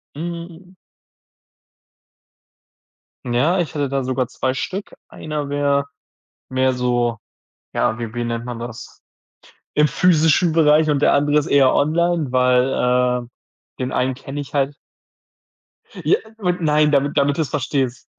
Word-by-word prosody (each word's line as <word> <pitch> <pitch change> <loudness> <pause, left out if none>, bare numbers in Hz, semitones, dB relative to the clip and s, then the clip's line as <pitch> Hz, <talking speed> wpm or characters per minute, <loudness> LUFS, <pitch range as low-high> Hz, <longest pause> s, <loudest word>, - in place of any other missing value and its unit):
Mhm. 170 +3 -7 2.5
Ja, 130 +9 +1
ich 165 -4 -2
hätte 145 -2 -1
da 135 -1 -2
sogar 130 -1 -1
2 130 +1 -2
Stück. 195 +9 -5
Einer 150 -2 -5
wär 140 0 +1 0.6
mehr 130 0 +2
so, 120 -2 0 0.6
ja, 110 - 0
wie 115 -2 -6
wie 120 - -2
nennt 115 0 -3
man 120 -2 -6
das? 120 0 -9 0.7
Im 150 0 +4
physischen 165 0 +3
Bereich 155 -1 +4
und 145 -1 +1
der - - +4
andere 145 +1 +2
ist 150 +1 +1
eher 135 -4 +4
online, 165 -1 +1
weil, 125 -1 +2
äh, - - -17 0.5
den 130 0 -2
einen 130 0 0
kenne 135 +2 -7
ich 145 - -7
halt. 140 0 0 1.3
J 405 - +3 0.2
und 180 -4 -1
nein, 150 -1 +3
damit 140 0 +1
damit 140 +1 +1
du's 155 -3 0
verstehst. 130 -2 -2
140 Hz, 135 wpm, -20 LUFS, 125-155 Hz, 2.5 s, Im